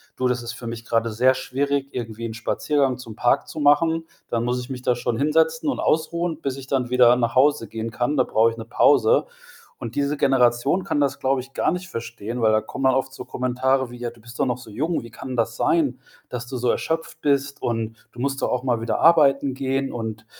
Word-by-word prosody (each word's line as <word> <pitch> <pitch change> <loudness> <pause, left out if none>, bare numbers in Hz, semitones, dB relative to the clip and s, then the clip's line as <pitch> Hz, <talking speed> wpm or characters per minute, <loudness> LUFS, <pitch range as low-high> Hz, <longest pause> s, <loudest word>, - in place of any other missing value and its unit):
„Du, 130 - 0
das 125 -1 0
ist 120 +1 -6
für 125 - -10
mich 115 0 -6
grade 115 0 0
sehr 130 +4 +3
schwierig, 140 +1 -1
irgendwie 115 -1 -5
'nen 110 - -6
Spaziergang 135 +3 0
zum 115 -4 -10
Park 125 +5 +2
zu 155 - -7
machen, 160 +3 +3 0.2
dann 115 -1 0
muss 125 +1 0
ich 125 +2 -7
mich 125 -1 -5
da 125 - +1
schon 120 -1 -2
hinsetzen 160 - +2
und - - -2
ausruhen, 165 0 0
bis 135 -3 -3
ich 135 - -8
dann 130 -2 -1
wieder 125 -1 +6
nach 120 0 -1
Hause 140 -3 +3
gehen 115 0 -5
kann. 125 +5 -1
Da 130 - +5
brauche 115 -1 +3
ich 115 - -10
'ne 115 - -7
Pause.“ 145 - +4 0.5
Und - - -7
diese 145 +1 0
Generation 135 +5 +2
kann 145 - 0
das, 140 -2 0
glaube 130 0 +1
ich, 135 +2 -14
gar - - +1
nicht 180 +2 -4
verstehen, 115 - -5
weil 110 -1 +4
da 110 - +3
kommen 135 +3 -5
dann 130 - +5
oft 130 0 -1
so - - -8
Kommentare 130 0 0
wie: 120 - -9
„Ja, 120 0 -4
du 115 -1 -18
bist 120 +1 -12
doch 140 - +3
noch 125 -2 -1
so 125 -3 -12
jung. 155 +9 -1
Wie 115 - -11
kann 130 +2 -7
das 115 0 -1
sein, 140 -7 +1 0.3
dass 125 0 -5
du 130 - -6
so 125 0 0
erschöpft 160 0 -3
bist? 140 -1 0
Und 115 -1 -3
du 120 - -13
musst 135 0 -1
doch - - +1
auch 125 0 -1
mal 120 -3 +1
wieder 115 - -1
arbeiten 140 -5 +5
gehen.“ 135 +1 -1
Und 110 -2 -5
130 Hz, 240 wpm, -23 LUFS, 120-140 Hz, 0.5 s, wieder